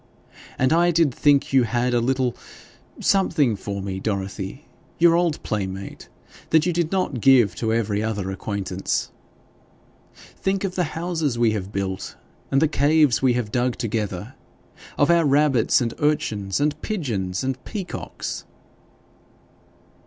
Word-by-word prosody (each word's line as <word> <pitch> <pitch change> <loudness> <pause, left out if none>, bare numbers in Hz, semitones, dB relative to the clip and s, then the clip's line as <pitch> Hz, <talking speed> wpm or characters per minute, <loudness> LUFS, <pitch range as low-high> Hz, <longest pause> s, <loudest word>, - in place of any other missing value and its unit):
And 130 +4 +2
I 170 +1 +4
did 165 -5 +2
think 140 0 +2
you 135 - +6
had 120 +1 0
a 120 - +2
little 130 0 0 0.6
something 160 - +2
for 100 0 -5
me, 95 -1 -4
Dorothy, 100 +5 -4 0.3
your 170 0 +5
old 170 -2 +1
playmate, 95 -2 -5 0.4
that 160 0 +4
you 175 - +1
did 170 -1 0
not 185 - -1
give 120 -8 +5
to 110 -1 -1
every 110 -2 0
other 105 -4 -2
acquaintance. 95 -1 -3 1.0
Think 195 0 -3
of 190 -2 -2
the 180 -1 0
houses 165 -7 -1
we 115 -2 +3
have 100 -2 -4
built 95 -2 -4 0.3
and 135 - +3
the - - +4
caves 150 -4 +3
we 130 -2 +3
have 120 -4 -2
dug 125 +1 0
together 105 -1 -3 0.6
of 145 +3 +4
our 170 -1 +4
rabbits, 140 -4 +3
and 115 -2 -1
urchins, 125 -10 0
and 150 +1 0
pigeons, 110 - -2
and 130 -1 -3
peacocks!' 195 -4 -6
125 Hz, 140 wpm, -23 LUFS, 105-155 Hz, 1.0 s, you